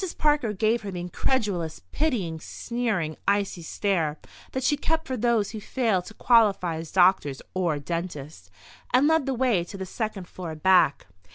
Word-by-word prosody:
Parker 295 -7 +2
gave 220 +3 +1
her 205 - -6
the 180 -2 -5
incredulous, 180 -2 -1
pitying, 215 - -1
sneering, 210 -8 -2
icy 200 -3 +1
stare 165 -3 -1 0.3
that 260 - -3
she 295 - +3
kept 320 +2 -1
for 260 - -3
those 230 -3 +1
who 220 - -6
failed 215 -7 0
to 220 - -11
qualify 200 -8 +3
as 160 -1 -7
doctors 175 -7 +3
or 175 -5 0
dentists, 150 - -5 0.4
and 255 +3 +5
led 320 -3 +2
the 270 - 0
way 240 -8 +2
to 185 +3 -9
the 190 - -4
second 200 -2 -4
floor 170 -4 -7
back. 180 -2 +3
195 Hz, 165 wpm, -26 LUFS, 170-240 Hz, 0.4 s, and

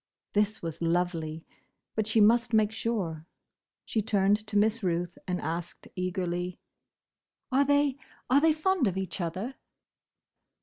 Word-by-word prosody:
This 210 0 +1
was 165 -1 -5
lovely! 165 -2 -1 0.5
But 215 -1 -1
she 220 +1 +3
must 235 +2 +4
make 215 -1 +4
sure. 185 -9 -3 0.6
She 220 - 0
turned 205 0 +2
to 210 -1 0
Miss 220 +2 +3
Ruth 175 -2 -1
and 180 -1 -1
asked 165 +2 -5
eagerly—"Are 180 +8 -4
they—are 285 -1 +1
they 320 0 +5
fond 315 - +2
of 190 -1 -1
each 190 0 -3
other?" 185 +10 -3
205 Hz, 125 wpm, -29 LUFS, 175-230 Hz, 0.6 s, they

